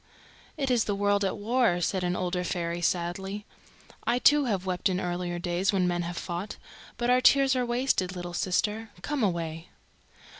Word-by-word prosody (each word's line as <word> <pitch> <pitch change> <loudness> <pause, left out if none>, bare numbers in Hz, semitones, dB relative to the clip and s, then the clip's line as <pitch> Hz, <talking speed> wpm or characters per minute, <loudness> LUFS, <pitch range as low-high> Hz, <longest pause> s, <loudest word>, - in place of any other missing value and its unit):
"It 270 -2 0
is 240 -3 +3
the 205 - -1
world 205 0 +2
at 195 - -1
war," 225 -3 +2
said 185 +2 0
an 180 0 0
older 180 0 -1
fairy 170 -1 -2
sadly. 190 +4 -2 0.6
"I 240 - +2
too 290 +3 +5
have 195 -6 -1
wept 185 +1 0
in 185 -1 0
earlier 175 -1 -2
days 175 +3 0
when 185 -3 +2
men 175 -1 0
have 170 0 -4
fought. 175 +4 -4 0.4
But 240 0 +1
our 250 0 +4
tears 270 +1 +5
are 250 -1 0
wasted, 240 -7 0
little 175 -1 -6
sister. 210 +5 -1
Come 295 +2 -2
away." 170 -4 -2
190 Hz, 180 wpm, -28 LUFS, 175-230 Hz, 0.6 s, too